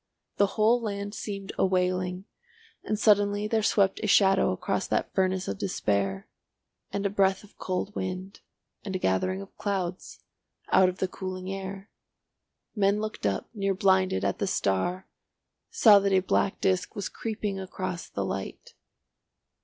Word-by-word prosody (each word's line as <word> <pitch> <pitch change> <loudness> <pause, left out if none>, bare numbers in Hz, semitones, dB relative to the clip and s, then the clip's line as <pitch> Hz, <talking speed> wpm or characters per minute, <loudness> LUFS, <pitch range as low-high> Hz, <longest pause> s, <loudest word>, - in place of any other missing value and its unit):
The 200 - +4
whole 225 +3 +4
land 205 -2 -4
seemed 200 -3 -5
a - - +4
wailing 185 0 0 0.6
and 215 - -1
suddenly 205 0 +3
there 220 0 +1
swept 195 -2 +2
a 215 - -1
shadow 195 -1 +4
across 95 - -2
that - - -1
furnace 185 0 +1
of 100 -1 -4
despair, 100 -1 -1 0.6
and 200 0 -2
a - - +3
breath 195 -1 +2
of 205 - -19
cold 185 +2 -3
wind, 185 +1 -5 0.4
and 195 -2 -4
a - - +2
gathering 185 - 0
of 195 - -12
clouds, 185 -3 -3 0.5
out 185 -1 +6
of 185 - -6
the 190 - 0
cooling 185 0 -5
air. 195 +1 -7 0.8
Men 200 0 +2
looking 215 - -2
up, 95 - -5
near 195 -3 -1
blinded, 190 - +2
at - - -1
the - - 0
star, 100 - 0 0.6
saw 220 - +7
that 200 0 0
a 190 -1 +4
black 195 +1 0
disc 185 -1 0
was 200 - -3
creeping 210 -3 -4
across 185 -2 -5
the 100 - -3
light. 95 0 -6
190 Hz, 155 wpm, -27 LUFS, 185-205 Hz, 0.8 s, saw